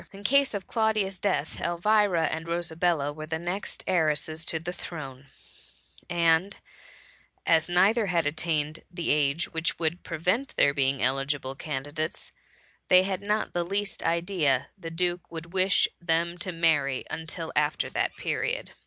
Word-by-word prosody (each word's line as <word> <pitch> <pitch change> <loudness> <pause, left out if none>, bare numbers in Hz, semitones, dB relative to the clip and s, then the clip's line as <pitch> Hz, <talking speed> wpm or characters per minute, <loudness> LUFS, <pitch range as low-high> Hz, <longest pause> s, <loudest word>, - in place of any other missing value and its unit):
In 200 0 -12
case 275 +1 +3
of 195 - -4
Claudia's 215 -4 0
death, 175 -7 -1
Elvira 180 0 +2
and 160 +1 -3
Ro 170 +1 -1
sabella 160 -3 0
were 155 +1 -7
the 160 0 -2
next 175 +5 -4
heiresses 160 -2 +1
to 160 - 0
the 175 +2 -5
throne; 140 -7 -8 0.8
and 170 +2 +2 0.9
as 165 0 +3
neither 200 +5 +4
had 170 -3 +1
attained 155 0 -1
the 175 -2 -2
age 150 +3 +1
which 160 0 0
would 165 +1 -1
prevent 185 - -1
their 140 - +4
being 135 -2 +1
eligible 135 +1 0
candidates, 145 +2 -4 0.6
they 185 0 +7
had 190 0 -2
not 210 +1 -1
the 175 - 0
least 200 +2 -2
idea 170 -6 +1
the 170 -5 -7
duke 175 +1 -1
would 165 +1 -8
wish 190 0 +4
them 170 0 +1
to 185 0 -1
marry 155 -6 +1
until 160 0 -5
after 150 0 +1
that - - -1
period. - - -2
170 Hz, 150 wpm, -27 LUFS, 155-185 Hz, 0.9 s, they